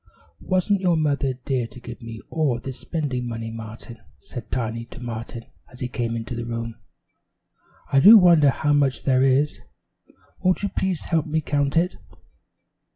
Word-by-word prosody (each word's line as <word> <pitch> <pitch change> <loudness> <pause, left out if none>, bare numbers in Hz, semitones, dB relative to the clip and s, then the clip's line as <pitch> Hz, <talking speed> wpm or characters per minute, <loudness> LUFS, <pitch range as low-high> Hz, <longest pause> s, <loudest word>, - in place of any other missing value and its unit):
"Wasn't 185 +1 +1
your 175 -3 +2
mother 145 -3 +1
dear 130 -4 0
to 115 +2 -13
give 120 0 -9
me 115 -1 -8
all 150 -7 +1
this 130 0 -7
spending 130 -3 -3
money, 115 -1 -5
Martin?" 115 +1 -9 0.2
said 120 -3 -9
Tiny 115 -1 -3
to 120 - -12
Martin 115 -1 -6 0.3
as 125 - -14
he 125 - -2
came 120 -2 -3
into 115 +1 -5
the 120 0 -4
room. 115 0 -4 1.2
"I 135 - +5
do 210 +10 +10
wonder 170 -7 +6
how 145 +2 +1
much 140 -2 +1
there 130 -2 +3
is; 135 +3 +2 0.8
won't 185 +1 +1
you 200 - 0
please 190 -4 -1
help 165 -3 0
me 155 +1 0
count 145 -1 0
it?" 175 +3 +1
130 Hz, 165 wpm, -23 LUFS, 115-155 Hz, 1.2 s, do